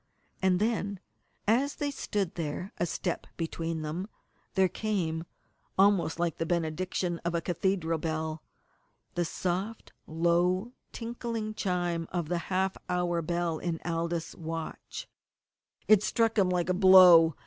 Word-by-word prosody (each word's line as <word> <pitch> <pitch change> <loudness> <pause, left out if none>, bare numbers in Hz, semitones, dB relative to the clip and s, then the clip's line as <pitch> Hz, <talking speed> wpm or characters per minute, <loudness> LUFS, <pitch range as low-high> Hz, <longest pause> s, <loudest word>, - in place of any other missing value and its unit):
And 185 -1 +3
then, 205 -3 0 0.5
as 260 +6 +2
they 290 -1 -2
stood 200 -9 -2
there, 170 +5 -4
a 175 - +1
step 175 +1 -3
between 165 -1 -3
them, 165 +6 -3 0.5
there 190 -1 +5
came 175 -5 -2 0.5
almost 195 -4 +3
like 170 -3 0
the 165 - 0
benediction 175 +1 -1
of 170 0 -2
a - - +2
cathedral 170 -1 0
bell 160 0 -3 0.7
the 175 - 0
soft, 185 +6 -3
low 175 +6 +1 0.2
tinkling 230 -2 -4
chime 175 -5 -1
of 170 -3 -2
the 175 -1 0
half 190 0 0
hour 175 -1 +1
bell 170 -1 -1
in 170 -2 -2
Aldous' 165 -1 -2
watch! 165 0 -6 0.8
It 215 -2 +7
struck 225 +1 +1
him 195 -4 +3
like 180 -1 0
a - - +3
blow. 180 -4 +8
175 Hz, 135 wpm, -29 LUFS, 165-195 Hz, 0.8 s, blow